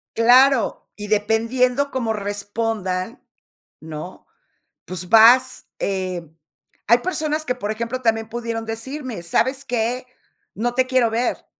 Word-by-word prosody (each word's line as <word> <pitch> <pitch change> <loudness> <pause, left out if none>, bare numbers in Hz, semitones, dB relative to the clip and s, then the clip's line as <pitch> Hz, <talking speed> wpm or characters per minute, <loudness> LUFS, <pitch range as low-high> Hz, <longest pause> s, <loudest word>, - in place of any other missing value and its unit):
Claro, 250 +3 +4
y 210 0 -7
dependiendo 230 +6 +1
cómo 240 -5 -2
respondan, 205 0 -3 0.6
¿no? 160 +3 -9 0.6
Pues, 180 -1 -5
vas, 245 +3 +5
eh 185 -4 -3 0.6
hay 235 +2 +6
personas 310 -1 -2
que, 250 - -1
por 210 -3 -4
ejemplo, 235 +3 -4
también 225 -1 +1
pudieron 230 -1 -4
decirme: 235 - -5
"¿Sabes 260 +10 0
qué?, 245 0 -2 0.5
no 240 +3 -2
te 260 0 +2
quiero 255 -3 +2
ver. 235 +2 -2
230 Hz, 120 wpm, -21 LUFS, 210-255 Hz, 0.6 s, hay